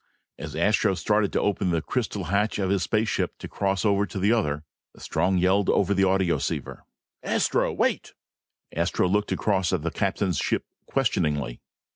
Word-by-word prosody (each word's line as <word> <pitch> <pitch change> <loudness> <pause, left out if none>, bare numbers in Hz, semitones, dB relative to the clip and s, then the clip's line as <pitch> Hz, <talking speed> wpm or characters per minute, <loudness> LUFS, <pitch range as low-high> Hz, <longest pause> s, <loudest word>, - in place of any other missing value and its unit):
As - - -7
Astro 100 +3 +2
started 105 +1 +1
to - - +2
open 100 -2 0
the 85 -2 +1
crystal 110 -4 -2
hatch 100 +5 0
of 95 -2 0
his 100 -2 0 0.2
ship - - -1
to - - -8
cross 95 0 -1
over 100 0 +2
to 95 - -7
the 100 +4 +3
other, 75 -10 0 0.3
Strong 90 +4 0
yelled 95 +2 +2
over 100 0 +3
the 95 0 +3
audioceiver. 95 -2 0 0.4
"Astro, - - +1
wait!" - - -1 0.6
Astro 85 +2 +1
looked 105 +3 0
across 95 -4 +1
at 90 -5 -1
the 85 - -1
captain's 95 -1 -1
ship - - -1 0.2
questioningly. 70 -5 0
95 Hz, 160 wpm, -25 LUFS, 90-100 Hz, 0.6 s, the